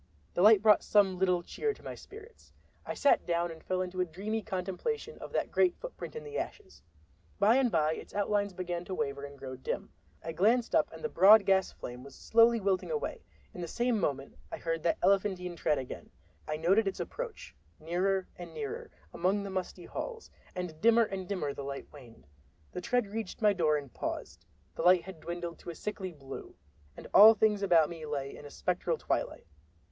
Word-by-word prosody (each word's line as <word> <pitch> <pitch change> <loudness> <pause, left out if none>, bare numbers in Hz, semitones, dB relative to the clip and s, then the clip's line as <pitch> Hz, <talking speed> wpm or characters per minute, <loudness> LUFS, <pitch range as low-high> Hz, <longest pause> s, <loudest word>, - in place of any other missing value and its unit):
The - - 0
light 210 +1 +7
brought 215 -1 +6
some 195 -3 +3
little 180 -2 +2
cheer 435 - -2
to - - -19
my - - -6
spirits. 440 +3 -14 0.4
I - - -3
sat 285 - +4
down 170 0 0
and 160 -1 -11
fell 185 0 -1
into 185 0 -3
a - - +2
dreamy 205 +7 -3
contemplation 215 - -4
of - - -8
that - - -1
great 360 -1 +3
footprint - - -8
in 465 - -6
the 445 0 -4
ashes. 390 -3 -7 0.6
By 215 +4 +5
and 260 -3 +2
by 155 -2 +2
its - - -9
outlines 205 0 +1
began 175 -1 -4
to 190 - -4
waver 140 -3 -3
and 140 0 -11
grow 130 -1 -7
dim. 130 - -4 0.3
I 165 - -4
glanced 225 +9 +2
up - - +3
and - - -11
the - - +1
broad 210 - +7
gas 190 -1 +3
flame 125 +1 -8
was 140 - -12
slowly 230 +1 +4
wilting 195 -2 0
away. 460 -2 -3 0.3
In 180 - -7
the 170 - -4
same 240 +5 0
moment 140 - -2 0.2
I - - -4
heard 165 -1 -2
that 170 +1 +1
elephantine 190 -3 +1
tread 150 -2 +1
again. 130 - -7 0.4
I 155 - -2
noted 195 +7 +3
its 195 - -3
approach, - - -6 0.3
nearer 185 +4 0
and 170 -2 -9
nearer, 145 -3 -5 0.2
along 195 +4 +1
the 200 - -6
musty 185 -1 -4
halls, 465 -2 -6 0.2
and 180 -4 -5
dimmer 230 +1 +6
and 195 -4 -4
dimmer 165 -8 -2
the - - -7
light 140 0 -5
waned. 120 - -14 0.5
The 180 - -5
tread 245 +4 +1
reached 210 0 -5
my 215 - +5
very - - +3
door 155 -3 +3
and 140 -3 -8
paused—the 70 - -7
light 180 +1 +5
had 190 -4 -10
dwindled 170 0 -6
to - - -9
a 170 - -6
sickly 195 -2 -5
blue, 135 -4 -10 0.4
and - - -10
all 220 +3 +10
things 215 -2 +2
about 170 -6 +5
me 165 -1 -8
lay 140 -2 -4
in - - -11
a - - -8
spectral 175 0 -1
twilight. - - -2
185 Hz, 205 wpm, -31 LUFS, 165-215 Hz, 0.6 s, all